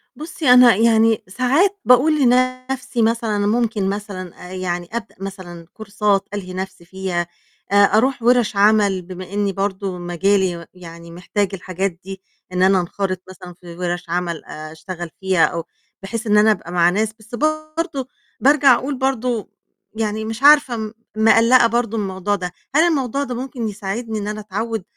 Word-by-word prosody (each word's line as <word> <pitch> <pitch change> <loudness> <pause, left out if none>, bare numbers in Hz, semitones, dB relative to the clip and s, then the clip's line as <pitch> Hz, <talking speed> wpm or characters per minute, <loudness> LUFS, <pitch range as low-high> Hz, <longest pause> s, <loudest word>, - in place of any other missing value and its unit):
بُصّي 310 -1 -3
أنا 250 -3 +7
يعني 225 0 +3
ساعات 280 - +1
باقول 290 +5 +4
لنفْسي 255 0 +1
مثلًا 225 -1 +1
أنا 205 0 0
ممكن 220 -3 0
مثلًا 190 -3 -7
آآ - - -7
يعني 175 -2 -3
أبدأ 230 -1 -5
مثلًا 185 -3 -8
كورسات 205 -2 -1
ألهي 185 -3 -5
نفْسي 185 -2 -6
فيها، 180 -1 -3 0.4
آآ، - - +1
أروح 220 +6 +3
وِرَش 240 -3 +3
عمل 200 -2 +3
بما 185 +1 -9
إني 205 -1 0
برضو 195 -1 -3
مجالي 175 0 0
يعني 170 -2 -12
محتاج 185 +3 -2
الحاجات 190 +1 -3
دي، 195 0 -8 0.3
إن 180 0 +1
أنا 190 0 +4
أنخرط 185 +1 -3
مثلًا 180 -1 -11
في 170 -1 -13
وِرَش 175 -1 -3
عمل 170 -1 -2
آآ، 155 0 -9
أشتغل 170 +2 -7
فيها 190 -3 +3
أو 170 -2 -3 0.4
بحيث 225 +4 -5
إن 210 - +4
أنا 215 +1 +6
أبقى 175 -5 -4
مع 175 -1 +4
ناس، 215 +4 -1
بس 220 +3 -9
برضو 310 0 -2 0.3
بارجع 280 -1 +5
أقول 275 +1 -3
برضه، 250 -4 -1 0.5
يعني 220 0 -2
مش 225 +4 -6
عارفة 285 -5 +6
م 215 -1 -5 0.2
مقلقة 230 +2 +5
برضه 230 -1 -1
من 210 - -1
الموضوع 190 +1 -2
ده، 180 -2 -5 0.2
هل 310 - +6
الموضوع 275 -4 0
ده 255 -3 -5
ممكن 250 -2 -4
يساعدني 215 +2 -4
إن 205 - -5
أنا 215 0 -4
أتعوّد 215 +1 -4
205 Hz, 165 wpm, -20 LUFS, 185-240 Hz, 0.5 s, أنا